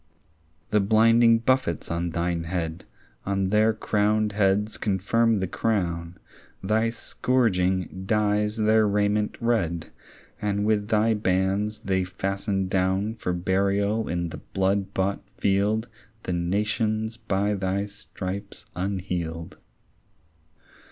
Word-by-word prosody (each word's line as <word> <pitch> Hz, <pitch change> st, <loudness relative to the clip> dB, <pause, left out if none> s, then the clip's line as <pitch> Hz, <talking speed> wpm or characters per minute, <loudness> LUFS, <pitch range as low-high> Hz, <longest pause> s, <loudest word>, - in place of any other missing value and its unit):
The 105 Hz, -, +4 dB
blinding 115 Hz, +3 st, +5 dB
buffets 115 Hz, -9 st, 0 dB
on 85 Hz, +1 st, -1 dB
thine 85 Hz, 0 st, -1 dB
head 85 Hz, -1 st, -3 dB, 0.4 s
On 95 Hz, -1 st, 0 dB
their 110 Hz, +1 st, +4 dB
crowned 105 Hz, 0 st, +1 dB
heads 100 Hz, +1 st, +1 dB
confirm 110 Hz, +2 st, +1 dB
the 95 Hz, -, 0 dB
crown; 85 Hz, -5 st, -1 dB, 0.5 s
Thy 110 Hz, +3 st, +2 dB
scourging 95 Hz, -7 st, 0 dB
dyes 105 Hz, 0 st, +1 dB
their 110 Hz, 0 st, +4 dB
raiment 105 Hz, +1 st, +1 dB
red, 100 Hz, -9 st, 0 dB, 0.5 s
And 105 Hz, 0 st, 0 dB
with 105 Hz, -1 st, +1 dB
thy 110 Hz, +1 st, +3 dB
bands 100 Hz, +1 st, 0 dB
they 95 Hz, -1 st, +1 dB
fasten 95 Hz, +1 st, -2 dB
down 95 Hz, +3 st, 0 dB
For 100 Hz, -5 st, -3 dB
burial 100 Hz, +4 st, +1 dB
in 85 Hz, 0 st, -1 dB
the -, -, -7 dB, 0.2 s
blood 95 Hz, +1 st, +1 dB
bought 95 Hz, +1 st, 0 dB, 0.2 s
field 105 Hz, +4 st, +1 dB, 0.4 s
The 90 Hz, -, -2 dB
nations 105 Hz, +5 st, -1 dB
by 105 Hz, -2 st, 0 dB
thy 95 Hz, 0 st, -1 dB
stripes 100 Hz, 0 st, -7 dB
unhealed. 90 Hz, -3 st, -3 dB
100 Hz, 110 wpm, -25 LUFS, 95-110 Hz, 0.5 s, blinding